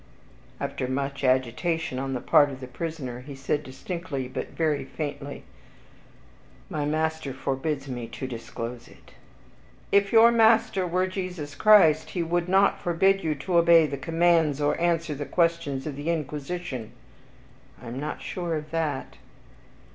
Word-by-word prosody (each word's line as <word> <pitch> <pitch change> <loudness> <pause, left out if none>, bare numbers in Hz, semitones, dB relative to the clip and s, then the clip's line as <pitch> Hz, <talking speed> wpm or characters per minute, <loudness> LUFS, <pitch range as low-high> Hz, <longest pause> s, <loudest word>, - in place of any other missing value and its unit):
After 130 - -3
much 140 +2 -3
agitation 130 +4 0
on 135 0 -3
the 125 - -3
part 145 -1 +5
of 135 -2 -8
the 130 - -7
prisoner, 130 -2 -5
he 140 +2 -9
said 135 +2 -1
distinctly, 140 0 -5
but 130 - -5
very 155 -3 0
faintly, 145 -2 -6 1.3
"My 150 -2 -1
master 155 -2 -1
forbids 135 +1 -2
me 120 -3 -5
to 125 - -6
disclose 120 -1 -6
it." - - -19 0.8
"If 200 0 +3
your 230 +1 +7
master 225 -4 +4
were 180 +2 +1
Jesus 180 -6 -5
Christ, 160 -4 +5
he 175 - +1
would 175 +1 -1
not 195 +1 +3
forbid 190 +3 +2
you 155 -1 0
to 170 +5 +1
obey 170 -1 +6
the 145 - -3
commands, 165 0 +2
or 145 0 +2
answer 165 -2 +1
the 145 0 -5
questions 165 -4 0
of 150 -3 -4
the 145 +4 -4
Inquisition." 150 -5 -4 0.9
"I - - -13
am 120 +3 -5
not 150 +2 -5
sure 175 -3 -3
of 150 0 -6
that." 160 -4 -2
150 Hz, 150 wpm, -26 LUFS, 135-170 Hz, 1.3 s, your